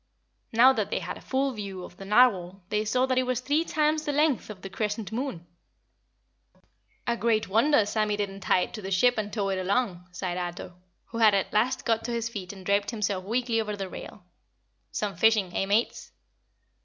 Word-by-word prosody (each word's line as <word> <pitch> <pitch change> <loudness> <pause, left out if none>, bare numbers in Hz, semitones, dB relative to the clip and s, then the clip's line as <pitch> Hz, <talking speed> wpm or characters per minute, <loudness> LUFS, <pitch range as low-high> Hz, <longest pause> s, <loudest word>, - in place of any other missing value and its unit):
Now 245 +4 +6
that - - -1
they - - -1
had - - -4
a - - -12
full 270 +1 0
view 200 -4 -6
of 175 - -11
the 195 - -9
Narwhal 195 -4 +3
they 210 0 0
saw 250 +4 +2
that 255 -1 +1
it 255 - -1
was 255 -2 0
three 290 +5 +1
times 310 -1 +1
the 295 - -1
length 295 -4 +1
of 190 -3 -9
the 195 - -6
Crescent 210 +1 -3
Moon. 225 -8 -4 1.6
"A 235 - +1
great 225 -2 +1
wonder 225 +3 +4
Sammy 210 0 0
didn't 200 -1 -3
tie 185 -1 +2
it - - -4
to 215 - -6
the 190 - -5
ship 225 +5 +3
and 210 -1 -3
tow 205 -2 -1
it 190 -1 -1
along," 185 -2 -1
sighed 180 0 -3
Ato, 175 0 -5 0.4
who 230 - -5
had 215 -3 +6
at 195 - -1
last 245 +5 +1
got 225 -1 +1
to 240 - -3
his 230 -1 -2
feet 195 -6 -6
and 190 -2 -12
draped 200 +1 +2
himself 205 -5 -2
weakly 235 +1 0
over 210 -1 -3
the 195 -1 -4
rail. - - -10 0.7
"Some 205 -2 -2
fishin' 215 -5 +3
eh, 195 - 0
Mates?" 215 +4 0
215 Hz, 205 wpm, -27 LUFS, 195-245 Hz, 1.6 s, Now